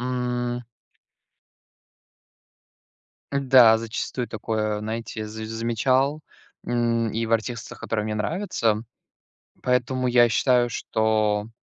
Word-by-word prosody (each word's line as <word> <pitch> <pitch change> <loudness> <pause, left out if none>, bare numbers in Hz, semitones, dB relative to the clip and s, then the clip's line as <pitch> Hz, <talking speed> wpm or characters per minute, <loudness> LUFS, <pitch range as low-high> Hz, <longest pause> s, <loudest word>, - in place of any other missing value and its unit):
м. 125 -1 -2 2.7
Да, 130 -5 +6
зачастую 115 +2 -4
такое, 110 -1 -2
знаете, 110 0 -5
за 110 +1 -7
замечал, 130 +6 0 0.5
м, 115 -2 0
и 115 +1 -1
в 115 - -3
артистах, 115 +1 -2
которые 110 -2 -2
мне 110 0 -2
нравятся. 115 - 0 0.8
Поэтому, 125 +1 0
я 120 -1 +5
считаю, 120 +1 +3
что 110 -1 0
115 Hz, 95 wpm, -24 LUFS, 110-125 Hz, 2.7 s, Да